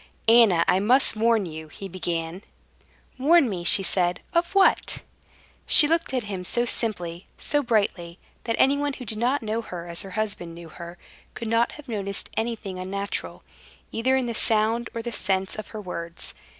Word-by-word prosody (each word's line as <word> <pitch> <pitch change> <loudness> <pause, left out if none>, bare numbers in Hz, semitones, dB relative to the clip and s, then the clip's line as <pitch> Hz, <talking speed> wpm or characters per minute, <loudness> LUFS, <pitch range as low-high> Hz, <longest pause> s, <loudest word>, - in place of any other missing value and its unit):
"Anna, 220 -7 +6
I 185 - +3
must 245 +5 +3
warn 225 -1 +2
you," 160 -1 -8
he 195 +5 -8
began. 170 -1 -4 0.8
"Warn 300 +2 +5
me?" 185 -5 -4
she 195 +3 +6
said. 180 -1 0
"Of 340 +3 0
what?" 390 -1 +3 0.6
She 300 - +8
looked 330 0 0
at 255 -3 -1
him 195 -3 -5
so 240 +6 +3
simply, 180 -8 -3
so 290 - +1
brightly, 200 -8 -1 0.3
that 230 - 0
anyone 285 +1 +2
who 255 - -8
did 215 0 -1
not 250 +2 +1
know 220 +1 -2
her 175 -6 -8
as 170 0 -3
her 195 - -8
husband 195 -6 -3
knew 170 -1 -11
her 170 +1 -10 0.4
could 230 -2 -5
not 230 +2 +2
have 300 -1 -12
noticed 200 -4 -4
anything 220 -4 -3
unnatural, 200 +2 -5 0.5
either 255 +4 +1
in 260 -1 +1
the 235 - -3
sound 225 +2 +1
or 230 - -4
the 240 - -4
sense 190 -3 -1
of 215 - -7
her 215 - -8
words. 170 -3 -7
215 Hz, 175 wpm, -25 LUFS, 180-240 Hz, 0.8 s, She